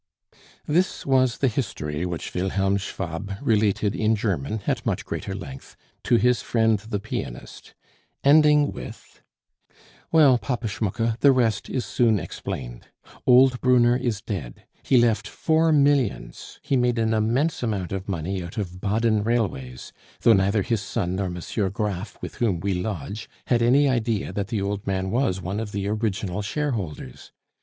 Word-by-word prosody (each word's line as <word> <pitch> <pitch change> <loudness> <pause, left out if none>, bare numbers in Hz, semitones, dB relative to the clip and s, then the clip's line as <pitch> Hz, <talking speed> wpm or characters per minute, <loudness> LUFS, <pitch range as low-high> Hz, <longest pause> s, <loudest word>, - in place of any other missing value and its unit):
This 175 +5 0
was 130 -3 +2
the 135 - +2
history 90 - -3
which 85 -2 -5
Wilhelm 95 +2 0
Schwab 95 0 -5
related 105 -2 +1
in 110 0 +2
German, 100 -2 -2
at - - -1
much - - -2
greater 95 - -4
length, 70 -9 -9 0.3
to - - +4
his 120 +1 +3
friend 110 -2 +2
the 105 0 -4
pianist, - - -7 0.5
ending 150 0 +5
with; - - -10 0.9
"Well, 145 -6 +6
Papa 115 +3 -3
Schmucke, 115 +2 -2
the 140 - +6
rest 115 -5 +1
is 130 -3 -2
soon 115 -3 +2
explained. - - -6 0.4
Old 125 0 +6
Brunner 120 -1 +4
is 120 -4 -2
dead. 80 - -6 0.2
He 130 - +3
left 115 -3 +2
four 160 +6 +1
millions! 140 - +1
He 140 -1 0
made 125 -1 +2
an 110 0 +1
immense 120 +9 +1
amount 105 -7 -2
of 95 +1 -4
money 95 +1 -2
out 85 - -9
of 90 -3 -4
Baden 110 +1 +1
railways, 90 - -2 0.3
though 115 - +6
neither 100 +1 +2
his 115 -2 -1
son 95 -3 -2
nor 100 -1 -1
M. 90 0 -5 0.3
Graff, 100 -1 -3
with - - -7
whom 105 -8 +1
we 100 +3 -1
lodge, 100 +2 -4 0.2
had 120 -2 +2
any 135 +5 +4
idea 115 -5 -1
that 100 -1 -2
the 110 -3 -2
old 100 0 -3
man 95 -1 -1
was 115 -6 +1
one 95 +4 -3
of 110 -2 -5
the 100 0 -2
original 105 -2 -2
shareholders. 105 - -4
110 Hz, 155 wpm, -24 LUFS, 95-120 Hz, 0.9 s, Well